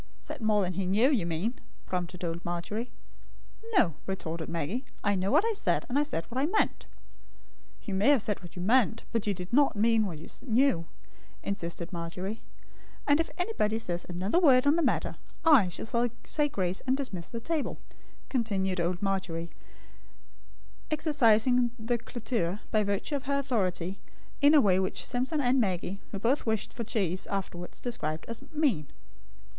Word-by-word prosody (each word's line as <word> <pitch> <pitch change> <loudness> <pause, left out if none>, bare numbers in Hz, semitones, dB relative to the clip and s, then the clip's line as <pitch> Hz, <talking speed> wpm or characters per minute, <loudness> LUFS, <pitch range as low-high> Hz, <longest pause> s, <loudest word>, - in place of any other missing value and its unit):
"Said 100 - -8
more 215 -2 +3
than 180 0 -1
he 185 +1 -2
knew, 220 +9 +4
you 210 - +1
mean," 175 +9 -2 0.3
prompted 180 0 -4
old 170 0 -3
Margery. 175 +8 -3 0.9
"No," 170 - +4
retorted 165 -4 -4
Maggie, 170 - -2 0.2
"I 205 - +3
know 190 0 0
what 305 - +4
I 455 - +1
said; 420 - 0
and 270 +3 +1
I - - +4
said 285 - -1
what 250 +2 -4
I 290 - +2
meant." 430 +6 0 1.0
"You 205 - -4
may 195 +7 +3
have 275 -7 +5
said 205 -2 -1
what 175 - -12
you 180 - -4
meant, 230 +1 +3
but 225 -2 -1
you 200 - +1
did 180 +4 -7
not 280 -1 +4
mean 220 0 +3
what 170 -4 -5
you 155 - -10 0.2
knew," 230 -8 +3 0.6
insisted 170 -2 -3
Margery; 180 +5 -4 0.6
"and 285 +1 +4
if 330 - 0
anybody 355 - 0
says 175 -6 -2
another 185 - +1
word 270 -6 +6
on 285 +2 +5
the 340 - +2
matter, - - 0 0.3
I 270 - +7
shall 235 +6 -1 0.2
say 295 -1 +1
grace 185 -5 -1
and 260 +1 +3
dismiss 190 -12 -4
the 230 - -5
table," 315 +4 -2 0.5
continued 195 -7 0
old 175 +2 -1
Margery, 175 -4 -2 1.4
exercising 250 -5 +4
the 235 +1 -1
cloture, 220 -6 -2
by 215 -1 +3
virtue 200 +8 -1
of 275 - -9
her 280 +1 +1
authority, 195 -9 -1 0.4
in 290 +2 +7
a 295 - +8
way 190 -4 +4
which 185 - -1
Simpson 260 +5 0
and 255 0 +3
Maggie, 190 -1 -2
who - - -3
both 235 +6 +1
wished 220 -2 -1
for 235 - -4
cheese, 190 -5 -1
afterwards 180 -3 -4
described 160 -10 -3
as 230 +1 -5
"mean." 275 - +1
210 Hz, 170 wpm, -29 LUFS, 180-255 Hz, 1.4 s, a